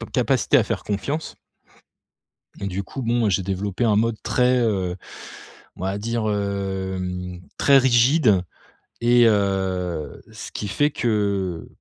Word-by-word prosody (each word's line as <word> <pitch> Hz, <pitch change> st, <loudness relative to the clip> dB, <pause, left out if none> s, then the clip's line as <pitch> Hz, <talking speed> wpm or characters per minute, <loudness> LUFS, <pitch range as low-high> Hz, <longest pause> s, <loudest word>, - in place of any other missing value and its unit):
ca -, -, -6 dB
capacité -, -, +2 dB
à -, -, +2 dB
faire -, -, -3 dB
confiance. 140 Hz, +10 st, -3 dB, 1.3 s
Et 100 Hz, -, -3 dB
du 95 Hz, +1 st, -3 dB
coup, 130 Hz, +7 st, -7 dB
bon, 115 Hz, -2 st, +1 dB
j'ai 95 Hz, +1 st, +1 dB
développé 100 Hz, +3 st, -2 dB
un 110 Hz, -3 st, +3 dB
mode 115 Hz, +1 st, +1 dB
très, 125 Hz, +3 st, +2 dB
heu, 95 Hz, -6 st, 0 dB, 0.8 s
on -, -, -9 dB
va 95 Hz, +2 st, -2 dB
dire, 115 Hz, 0 st, -2 dB
hem, 95 Hz, -3 st, -3 dB, 0.2 s
très 140 Hz, -1 st, +6 dB
rigide, 125 Hz, -, +4 dB, 0.6 s
et 120 Hz, 0 st, +5 dB
heu, 95 Hz, -6 st, -1 dB
ce -, -, -9 dB
qui 105 Hz, -, -5 dB
fait 145 Hz, +10 st, +1 dB
que, 100 Hz, -, -1 dB
100 Hz, 135 wpm, -23 LUFS, 95-120 Hz, 1.3 s, très